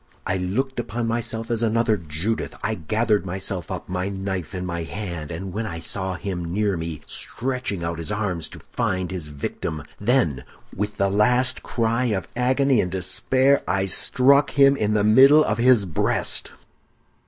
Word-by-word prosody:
I 95 - 0
looked 120 +9 -2
upon 120 0 -3
myself 115 0 -2
as 115 -1 -1
another 115 -1 +2
Judith; 85 +5 -3
I 110 - 0
gathered 110 +4 0
myself 95 -2 -3
up, - - -5
my 90 +1 -2
knife 95 -3 -4
in 90 0 -3
my 85 -1 -3
hand, 85 -3 -5
and 90 +3 -6
when 110 +2 -2
I 85 - -5
saw 95 +2 -1
him 90 -3 -4
near 100 0 +1
me, 80 -2 -5
stretching 125 -7 -4
out 85 0 -3
his 85 +5 -3
arms 95 -6 -2
to - - -11
find 95 -1 -2
his 90 -5 -4
victim, 75 +1 -5 0.2
then, 105 - +1 0.3
with 105 +2 -3
the 100 - +2
last 125 +5 +3
cry 115 +1 0
of 100 -6 -1
agony 130 0 +3
and 90 - -2
despair, 130 +9 +2
I 95 +1 +1
struck 140 +8 +3
him 140 -1 +5
in 105 -4 0
the 105 - +2
middle 135 +8 +7
of 105 -4 -1
his 120 -4 +5
breast. 85 -5 +1
105 Hz, 170 wpm, -23 LUFS, 90-120 Hz, 0.3 s, middle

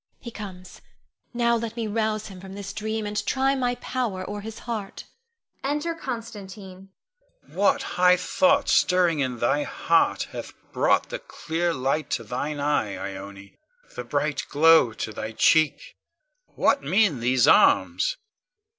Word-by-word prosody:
He 235 - -9
comes; 185 -4 -10 0.5
now 235 -1 +2
let 230 -1 -4
me 230 -2 -3
rouse 215 0 -1
him 190 -3 -10
from 190 0 -10
this 200 -1 -7
dream, 220 0 -3
and 210 0 -2
try 270 +1 +1
my 250 -2 0
power 235 -7 -3
o'er 205 0 -5
his 220 +1 -8
heart. 220 -5 -5 0.6
[Enter 295 +4 -1
Constantine. 205 - -8 0.6
Con. - - -20
What - - +2
high 180 0 +3
thoughts 280 +9 +2
stirring 180 -4 +3
in 130 -3 -1
thy 120 +5 +1
heart - - +1
hath - - -7 0.2
brought - - +2
the - - -4
clear 170 +2 -3
light 135 0 -1
to - - -11
thine 135 +6 -4
eye, 140 -8 0 0.2
Ione, 100 0 -10 0.4
the - - -4
bright - - -2
glow 160 -4 +5
to 110 0 -5
thy 110 +2 -6
cheek? 155 +6 +2 0.6
What 280 - +2
mean 195 - +2
these 125 +2 +2
arms? - - +4
195 Hz, 145 wpm, -25 LUFS, 150-230 Hz, 0.6 s, glow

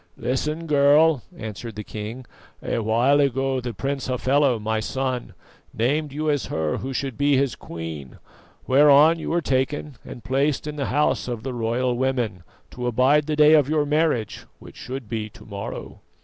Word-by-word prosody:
"Listen, 150 +6 -2
girl," 145 0 +4 0.2
answered 110 0 -7
the 105 - -5
king. 110 +5 -7 0.4
"A - - -1
while 120 +6 +3
ago 135 -1 +1
the 120 0 -4
Prince 135 +4 -3
Hafela, 130 0 +2
my 110 +1 -1
son, 130 +2 -3 0.4
named 145 +6 0
you 155 +3 -3
as 145 -3 0
her 80 -1 -1
who 135 - -5
should 135 -1 -4
be 145 -1 +3
his 135 -2 +1
queen, 80 -5 -8 0.5
whereon 145 +4 +6
you - - -5
were 170 +1 +1
taken 135 +1 -1
and 120 - -10
placed 140 +2 0
in 150 -1 -5
the 140 -2 -2
House 145 -1 +1
of 120 -3 -4
the 130 0 -4
Royal 120 +2 0
Women, 120 -7 -1 0.3
to 125 0 -4
abide 135 +5 +3
the 155 - 0
day 150 +1 +6
of 150 -3 +4
your 150 -1 +2
marriage, 150 -7 0
which - - -14
should 130 -2 -7
be 110 -1 -4
to - - -16
morrow." 100 -1 -7
130 Hz, 175 wpm, -23 LUFS, 115-145 Hz, 0.5 s, whereon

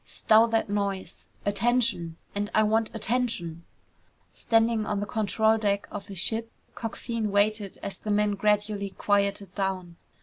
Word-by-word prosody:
"Stow 220 +1 +4
that 225 -1 +1
noise! 200 -2 -3 0.2
Attention! 205 -5 +1 0.2
And 205 0 -2
I 215 - +5
want 220 +1 +2
attention!" 215 -8 -1 0.7
Standing 225 -1 +2
on 210 -1 -1
the 205 - -2
control 220 +1 +2
deck 200 -1 0
of 200 - -6
his 195 - -8
ship, 225 +5 -2 0.2
Coxine 225 -1 -3
waited 205 0 +1
as 200 - -5
the 215 - -6
men 210 0 +2
gradually 205 0 +1
quieted 200 -1 0
down. 185 -3 -3
205 Hz, 140 wpm, -27 LUFS, 200-220 Hz, 0.7 s, I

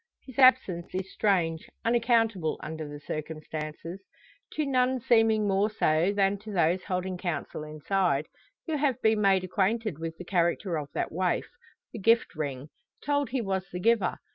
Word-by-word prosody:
His 260 -1 -9
absence 230 -11 +4
is 190 0 -4
strange, 170 -6 0 0.2
unaccountable, 225 -7 +2
under 155 -1 -5
the 145 0 -8
circumstances. 155 +3 -6 0.5
To 305 - -1
none 255 -1 +2
seeming 225 -3 +3
more 200 +2 +2
so 170 -3 +2
than 200 0 +1
to 215 +1 -9
those 180 -1 +1
holding 185 -1 -2
counsel 155 -3 -4
inside, 155 0 0 0.4
who 320 -3 -1
have 275 -4 +1
been 220 -1 +3
made 195 -2 +4
acquainted 200 -1 0
with 165 0 -5
the 180 - -8
character 175 0 0
of 145 -1 -8
that - - -2
waif 180 +2 0 0.5
the - - -6
gift 230 +4 +3
ring 145 -2 -4 0.4
told 285 -1 +1
he 260 -1 -1
was 190 -3 -2
the 180 - -5
giver. 220 -2 +2
190 Hz, 160 wpm, -28 LUFS, 165-225 Hz, 0.5 s, absence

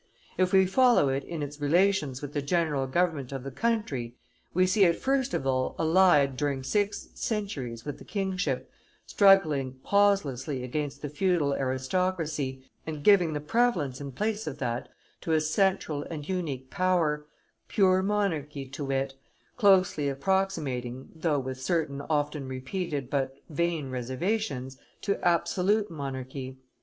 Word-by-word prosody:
If 185 -1 +2
we 190 -1 +6
follow 240 - +4
it 135 +1 -1
in 165 -3 -5
its 145 +1 -7
relations 150 -4 +2
with 145 0 -6
the 145 - -1
general 145 -3 0
government 155 -3 0
of 135 -2 -5
the 135 - -6
country, 140 - -1 0.4
we 185 +1 +3
see 195 +2 +3
it 170 -3 +5
first 265 -1 +1
of 160 - -2
all 130 -1 0
allied 160 -5 +4
during 140 -2 -1
six 205 +8 -1
centuries 145 - -3
with 145 - -5
the - - -11
kingship, 190 -2 -2 0.3
struggling 155 -10 +4
pauselessly 155 -10 +1
against 145 +4 -4
the 145 - -3
feudal 150 -2 +1
aristocracy, 140 0 -1 0.2
and 155 -2 -5
giving 180 -5 +5
the 150 - -2
prevalence 150 - 0
in 140 -1 -5
place 210 - -2
of 145 -2 -4
that 120 -3 -3 0.3
to 165 - -1
a 160 - +4
central 155 -1 +1
and 150 -3 -6
unique 150 -9 -3
power, 165 -5 +1 0.4
pure 190 -2 +3
monarchy 165 -9 -1
to 140 +2 -6
wit, 135 0 -1 0.4
closely 185 - +4
approximating, 140 -6 -1
though 160 -2 0
with 130 -1 -4
certain 145 -2 -1
often 150 -2 -1
repeated 140 +2 -3
but 135 -1 -1 0.2
vain 160 -3 -1
reservations, 130 - -2 0.2
to 200 - -1
absolute 185 +4 +2
monarchy. 130 -3 -6
150 Hz, 145 wpm, -28 LUFS, 135-185 Hz, 0.4 s, we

